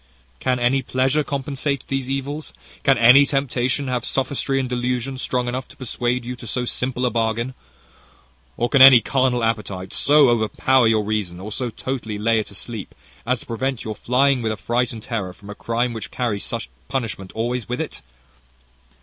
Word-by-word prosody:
"Can 130 -1 +1
any 125 +3 +2
pleasure 130 +4 +1
compensate 140 0 -3
these 135 -1 -2
evils? 140 +3 -4 0.3
Can 135 -1 +4
any 125 +4 +8
temptation 135 -1 0
have 125 -2 -1
sophistry 135 +1 -1
and 130 - -1
delusion 125 +1 -2
strong 125 -1 -1
enough 125 +1 -3
to - - -16
persuade 125 -1 -2
you 125 +1 -4
to 120 - -10
so 125 +3 -2
simple 125 +1 -1
a 125 - +1
bargain? 115 +2 -1 1.0
Or 120 - +1
can 140 +1 +3
any 130 -2 +11
carnal 130 -1 +1
appetite 100 -4 -2
so 145 -1 +5
overpower 120 +2 +3
your 110 -1 +3
reason, 100 -5 -2
or 105 +3 -7
so 125 +3 -3
totally 115 -3 -4
lay 110 +2 +2
it 110 - -4
asleep, 105 +1 -6 0.3
as 125 -1 +1
to - - -12
prevent 130 +2 -2
your 110 -1 -4
flying 130 +3 +2
with 110 -1 -1
affright 120 +4 -1
and 110 -2 -8
terror 100 -7 -3
from 100 +2 -12
a - - -5
crime 120 +2 -1
which 110 -3 -5
carries 115 -5 -2
such 65 - -4 0.2
punishment 110 -7 -3
always 120 0 -2
with 125 - -2
it? - - -4
125 Hz, 180 wpm, -22 LUFS, 115-130 Hz, 1.0 s, any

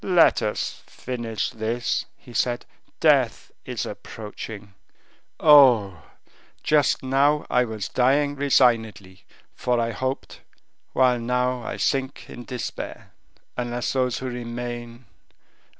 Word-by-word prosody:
"Let 180 -3 +4
us 105 -1 -3
finish 115 -5 -4
this," 115 +2 -2
he 120 - -15
said; 120 0 0 0.3
"death - - +2
is - - -3
approaching. 105 -1 -8 0.7
Oh! 120 - +6 0.6
just 150 -3 +2
now 140 +3 +2
I 125 0 +3
was 110 -4 -5
dying 140 +5 +2
resignedly, 115 -9 +1 0.3
for 125 -1 0
I 115 0 0
hoped... 130 +3 -4 0.5
while 125 -1 +3
now 125 +1 0
I - - -5
sink 135 0 -1
in 120 - -9
despair, 125 -2 -6 0.4
unless 120 0 -2
those 130 -2 0
who 130 - -6
remain... 120 0 -6
120 Hz, 110 wpm, -24 LUFS, 115-130 Hz, 0.7 s, Oh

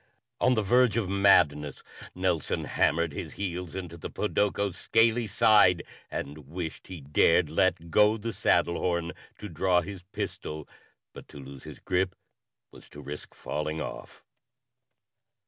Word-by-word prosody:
_ - - -38 0.4
On 125 - +4
the 110 - +1
verge 120 +1 +3
of 105 -5 -1
madness, 75 -8 +3 0.3
Nelson 90 -4 -1
hammered 85 -2 +1
his - - -6
heels 90 -3 -5
into 90 -3 -6
the - - -7
podoko's 100 -2 -1
scaly 115 +3 +2
side 105 -4 +4 0.3
and 75 0 -6
wished 85 -1 -6
he 90 -4 -8
dared 75 +3 +3
let 85 0 +1
go 105 +4 +4
the 115 +1 -5
saddle 85 - +2
horn 85 -1 -1 0.3
to 105 - -7
draw 90 +1 +2
his 95 +1 -8
pistol, 75 -4 -6 0.5
but - - -12
to - - -13
loose 70 -1 -11
his - - -9
grip 90 0 -1 0.6
was - - -16
to 75 - -12
risk 75 +1 -9
falling 75 +1 -4
off. - - -8
90 Hz, 145 wpm, -28 LUFS, 80-100 Hz, 0.6 s, On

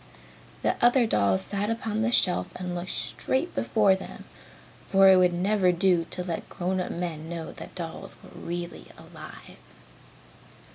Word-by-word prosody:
The - - 0
other 245 0 +5
dolls 100 - +2
sat 200 - -2
upon 225 -1 -2
the 235 +2 +1
shelf 180 -6 +3
and 180 -1 -4
looked 175 +1 -4
straight 275 +7 -1
before 210 -4 +3
them, 190 - -9 0.6
for 195 0 +5
it 190 -1 +8
would 180 -1 +5
never 185 +1 +2
do 175 -1 +2
to 180 - -3
let 170 -2 -5
grown 185 0 -2
up 180 - -4
men 165 -2 -4
know 165 -2 -5
that - - -11
dolls 165 -3 -5
were - - -13
really 175 0 -5
alive. - - -12
180 Hz, 155 wpm, -27 LUFS, 175-205 Hz, 0.6 s, it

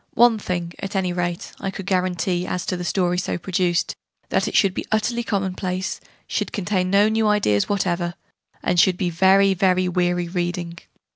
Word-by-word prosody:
One 235 -2 +5
thing, 175 -3 -3
at 195 +1 -5
any 185 -2 0
rate, 175 -1 -3
I 195 - -3
could 195 -1 -7
guarantee 180 -1 0
as 180 - -3
to - - -1
the 180 - -4
story 180 0 +1
so - - -2
produced 175 -1 0 0.3
that - - +1
it - - -4
should 195 -3 +4
be - - -3
utterly 235 +2 +1
commonplace, 190 -3 -2 0.3
should - - -2
contain 185 -2 -1
no 200 +2 +5
new 220 0 +1
ideas 155 - +2
whatever, 175 -3 -1 0.5
and 180 - +2
should 180 +1 +4
be 180 -2 -1
very 190 +3 +4
very 185 -1 +2
weary 175 -1 0
reading! 175 -1 -3
185 Hz, 180 wpm, -22 LUFS, 175-195 Hz, 0.5 s, One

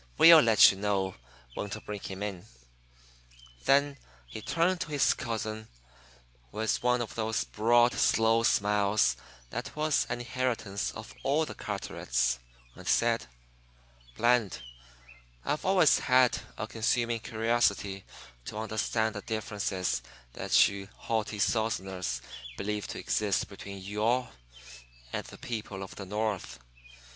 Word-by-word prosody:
We'll 165 -1 +10
let 115 -6 +7
you 95 - -7
know 100 -2 0 0.4
when 100 - -4
to 110 - -5
bring 105 -1 -6
him 95 +1 -6
in." 100 -4 -5 1.2
Then 140 0 +3 0.3
he - - -8
turned 170 - +1
to - - -2
his 145 -2 +3
cousin 110 -1 -4 0.8
with 110 +1 -1
one 125 0 +2
of 115 - -8
those 110 0 -1
broad, 120 +2 +3
slow 115 0 +3
smiles 100 - +2 0.4
that - - -5
was 150 -3 +1
an - - -2
inheritance 120 -5 -2
of 110 0 -9
all 150 +4 +1
the - - -7
Carterets, 60 0 -2 0.3
and - - -12
said: - - +2 0.9
"Bland, 120 - +2 0.8
I've 150 - -1
always 185 -5 +5
had 130 -1 +4 0.2
a 110 - -3
consuming 115 +1 0
curiosity 110 -4 0 0.4
to 105 - -6
understand 110 0 -1
the 105 - -5
differences 105 - -2 0.3
that - - +4
you 100 0 -7
haughty 110 -2 -2
Southerners 95 - -1 0.3
believe 105 0 -3
to - - -6
exist 105 -2 0
between 100 -1 -9
'you 105 +2 -4
all' 125 +3 +2 0.8
and - - -3
the - - -11
people 105 -4 -5
of 95 - -9
the 100 - -8
North. 105 -1 -2
110 Hz, 130 wpm, -29 LUFS, 100-120 Hz, 1.2 s, We'll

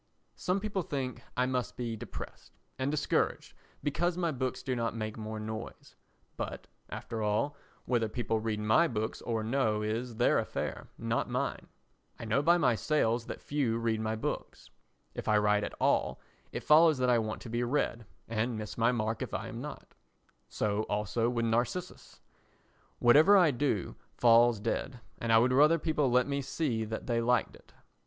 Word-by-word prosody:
Some 185 +2 0
people 200 -2 -2
think 135 -6 -4 0.2
I 125 - +3
must 130 -1 -2
be 120 -2 -3
depressed - - -9 0.2
and 130 +1 0
discouraged 150 0 0 0.3
because 175 +4 0
my 170 -2 0
books 130 -2 -3
do 130 - -1
not 115 -1 -1
make 110 -1 -4
more 110 0 -5
noise; 110 +1 -7 0.4
but, - - -5 0.2
after 115 -1 -5
all, 110 +8 0 0.3
whether 115 -3 +1
people 110 -1 -1
read 110 -1 -2
my 110 +11 +4
books 110 -4 -3
or 115 -2 -2
no 110 -3 +1
is 115 +3 -3
their 120 +2 +3
affair, - - -4
not - - -1
mine. - - -2 0.5
I - - -7
know 110 +5 +2
by 170 +4 +5
my 125 -8 +3
sales 115 -2 0
that - - -7
few 135 -6 0
read 115 -1 0
my 110 0 -1
books. 110 - -5 0.4
If - - -6
I 105 - +4
write 105 0 +3
at - - -4
all, - - +1 0.3
it - - -5
follows 155 0 +6
that 125 -1 +2
I 120 - +4
want 110 -1 -3
to 120 - -8
be 120 +1 0
read 120 -3 -1 0.2
and 115 +1 -1
miss 110 +1 -6
my 115 +2 +4
mark 110 -3 -2
if - - -3
I - - -4
am - - -6
not. - - -8 0.6
So 105 0 0
also 105 +3 0
with 120 -1 0
Narcissus. 120 +11 -2 0.8
Whatever 155 +12 +7
I 175 -5 +5
do 125 -7 -1 0.2
falls 120 -1 +5
dead, 120 +4 -3 0.2
and 115 - -1
I 115 - +7
would 125 +3 +4
rather 150 +5 +6
people 150 -4 +1
let 125 +1 +4
me 140 0 -1
see 130 -5 -1
that 110 +1 -5
they 115 -2 0
liked 125 +1 +1
it. - - -20
120 Hz, 180 wpm, -31 LUFS, 110-140 Hz, 0.8 s, Whatever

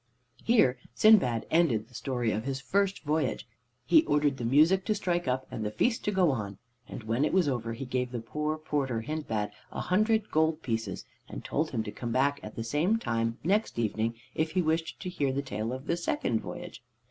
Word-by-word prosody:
Here 215 - +4 0.2
Sindbad 180 - +5
ended 135 -11 +3
the 125 - -23
story 120 -2 -1
of 110 +1 -2
his 135 -1 -2
first 195 +7 0
voyage. 155 -5 -1 0.4
He 320 - +6
ordered 145 -2 +2
the 120 - -5
music 155 +10 +4
to 215 - +1
strike 175 -6 -1
up 130 +1 0
and 110 - -4
the 105 - -1
feast 230 - 0
to 210 - +1
go 185 -5 +3
on, 105 -6 -4 0.3
and - - -7
when 115 +5 0
it 155 - +1
was 185 -4 +3
over 120 -4 -1
he 130 +4 -6
gave 125 0 -2
the 120 - -3
poor 150 +7 -2
porter 140 -6 -1
Hindbad 115 -7 -3 0.2
a - - -5
hundred 215 +3 +1
gold 160 0 +2
pieces 115 -2 -3 0.2
and - - -8
told 155 +2 0
him 115 -4 -2
to 105 - -6
come 120 +1 -5
back 140 +3 +2
at 105 - -9
the 115 - -3
same 155 - +1
time 115 - -1
next 200 - +1
evening 115 0 0 0.2
if 155 0 -1
he 185 - +2
wished 160 +1 -1
to - - -5
hear 145 -7 0
the 140 +1 -2
tale 115 -3 -3
of 130 +2 -6
the 170 - +1
second 125 -8 -1
voyage. 175 +1 -8
140 Hz, 210 wpm, -29 LUFS, 115-170 Hz, 0.4 s, He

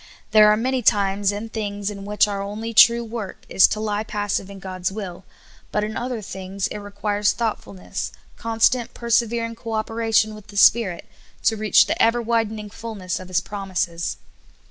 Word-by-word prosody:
There 215 -1 +7
are 210 - +3
many 255 +3 0
times 200 -2 +2
and 215 +2 -6
things 205 -2 -3
in 200 -1 -8
which 210 +1 +3
our 200 -1 -3
onl}^ 215 +3 -5
true 235 +2 +7
work 225 -3 -7
is 190 - +6
to 215 - -3
lie 210 -1 -1
pas 205 -2 -3
sive 195 - -1
in 200 - -9
God's 185 -1 -4
will, 190 -3 -7 0.5
but 210 - 0
in 215 +1 -4
other 245 -3 -3
things 190 0 -5
it - - -5
requires 205 0 -1
thoughtfulness, 100 - -4 0.2
constant, 230 +2 +1
persevering 235 0 0
co 230 0 -7
operation 220 0 +1
with 215 -2 -12
the 205 -1 -10
Spirit, 200 -5 +4 0.4
to 220 - +3
reach 215 -1 +4
the - - -1
ever 230 +1 +4
widening 220 -2 -1
fullness 205 -6 -5
of 185 - -9
His 185 0 +1
promises. 180 - -3
210 Hz, 175 wpm, -22 LUFS, 195-225 Hz, 0.5 s, There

